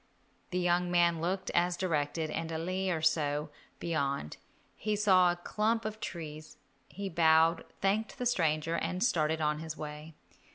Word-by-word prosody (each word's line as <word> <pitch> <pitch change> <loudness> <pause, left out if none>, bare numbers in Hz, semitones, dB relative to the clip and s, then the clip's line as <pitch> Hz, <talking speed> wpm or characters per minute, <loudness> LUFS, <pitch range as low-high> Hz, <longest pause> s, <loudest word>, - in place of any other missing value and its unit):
The 180 - -2
young 175 0 +2
man 170 -2 +3
looked 185 +3 -2
as 175 0 +1
directed, 155 -3 -1
and 165 +1 -3
a 160 - -2
li 185 +3 -2
or 160 -3 -1
so 150 -1 +1 0.3
beyond 140 - -2 0.4
he 215 -1 -1
saw 185 -4 +5
a - - -2
clump 215 +5 -1
of 215 0 -4
trees. 155 -6 -7 0.3
He 200 0 -5
bowed, 165 -1 +4 0.2
thanked 205 +2 0
the 250 - -3
stranger, 165 -8 +1
and 180 +3 -1
started 160 -8 +1
on 150 0 +1
his 160 -1 -6
way. 150 +1 -7
170 Hz, 160 wpm, -31 LUFS, 155-185 Hz, 0.4 s, saw